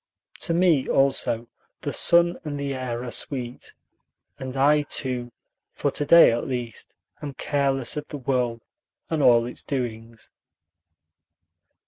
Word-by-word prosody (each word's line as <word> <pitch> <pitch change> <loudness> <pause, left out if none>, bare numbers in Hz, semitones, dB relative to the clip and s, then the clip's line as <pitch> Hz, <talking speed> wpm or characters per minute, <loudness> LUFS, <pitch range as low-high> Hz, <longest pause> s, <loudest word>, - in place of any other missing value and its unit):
To 165 - 0
me 170 -6 +3
also 130 -4 +1 0.4
the - - -4
sun 170 0 +3
and 145 -2 -5
the 140 -1 -2
air 125 -2 -4
are 125 - -6
sweet, 125 -2 -3 0.6
and 130 0 -6
I 150 +2 +4
too, 125 -4 -3 0.4
for - - -1
to - - -2
day 170 -5 +8
at 115 - -2
least, 120 -4 -6 0.3
am 145 -2 -6
careless 135 -3 -1
of 150 - -5
the 145 - -6
world 125 -3 -1 0.5
and 160 -2 0
all 120 -3 +5
its 125 - -7
doings. 115 -4 -5
130 Hz, 135 wpm, -24 LUFS, 120-145 Hz, 0.6 s, day